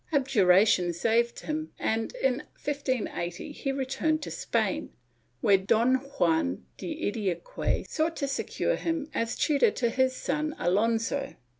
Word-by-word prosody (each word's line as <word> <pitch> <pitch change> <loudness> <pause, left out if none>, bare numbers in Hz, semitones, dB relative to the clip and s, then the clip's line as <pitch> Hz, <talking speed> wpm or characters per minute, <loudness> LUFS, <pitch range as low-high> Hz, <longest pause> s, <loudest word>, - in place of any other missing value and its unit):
Abjura 215 - +5
tion 180 -5 +2
saved 230 +7 +1
him 310 0 -4
and, 225 - -1
in - - +1 0.3
1580, 260 - -2
he 280 -1 -3
returned 275 +4 -1
to - - -5
Spain, - - -1 0.5
where 200 -5 +5
Don 230 +6 +3 0.2
Juan 160 - +1
de 320 0 -3
Idiaquez 210 - -2
sought 325 +1 0
to 280 - -2
secure 275 - -1
him 325 -2 -2
as 230 0 -1
tutor 305 +10 +4
to 240 - -1
his 260 +1 +2
son 305 +2 -2
Alonso. 225 +9 0
260 Hz, 135 wpm, -28 LUFS, 210-305 Hz, 0.5 s, Abjura